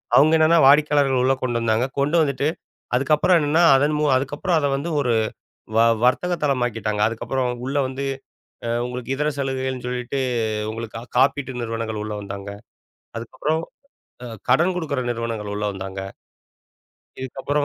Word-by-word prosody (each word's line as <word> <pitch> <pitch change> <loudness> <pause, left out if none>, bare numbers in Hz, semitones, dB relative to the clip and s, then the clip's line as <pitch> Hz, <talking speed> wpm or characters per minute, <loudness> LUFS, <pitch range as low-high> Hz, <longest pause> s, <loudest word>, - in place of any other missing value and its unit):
அவங்க 155 +3 +6
என்னன்னா 160 +1 +5
வாடிக்கையாளர்கள 145 -2 +4
உள்ள 130 +1 +4
கொண்டு 120 -2 0
வந்தாங்க, 115 +1 +1
கொண்டு 145 +4 +1
வந்துட்டு, 140 -1 0 0.5
அதுக்கப்புறம் 150 +7 +3
என்னன்னா 155 +3 +2
அதன்மு 150 +2 +2
அதுக்கப்புறம் 145 +7 -1
அத 145 - +1
வந்து 150 +5 -4
ஒரு 125 -4 +1 0.6
வ - - +6 0.2
வர்த்தக 175 +8 +2
தளமாக்கிட்டாங்க. 115 -6 0
அதுக்கப்புறம் 125 +3 -2 0.2
உள்ள 135 +2 -2
வந்து 135 +1 -5 0.6
அ - - -2 0.2
உங்களுக்கு 125 0 -6
இதர 150 +2 0
சலுகைகள்ன்னு 130 -2 -3
சொல்லிட்டு 125 +2 -3 0.5
உங்களுக்கா 115 0 -6 0.2
காப்பீட்டு 135 +1 +2
நிறுவனங்கள் 115 -1 -3
உள்ள 105 0 -5
வந்தாங்க. 100 0 -7 0.7
அதுக்கப்புறம் 150 +7 -2 0.6
அ - - -6 0.2
கடன் 170 +8 +4
குடுக்கற 150 -6 -2
நிறுவனங்கள் 115 -3 -3
உள்ள 105 +1 -3
வந்தாங்க. 95 0 -6 1.2
இதுக்கு 130 0 -6
அப்புறம் 145 +1 +1
130 Hz, 135 wpm, -22 LUFS, 115-145 Hz, 1.2 s, அவங்க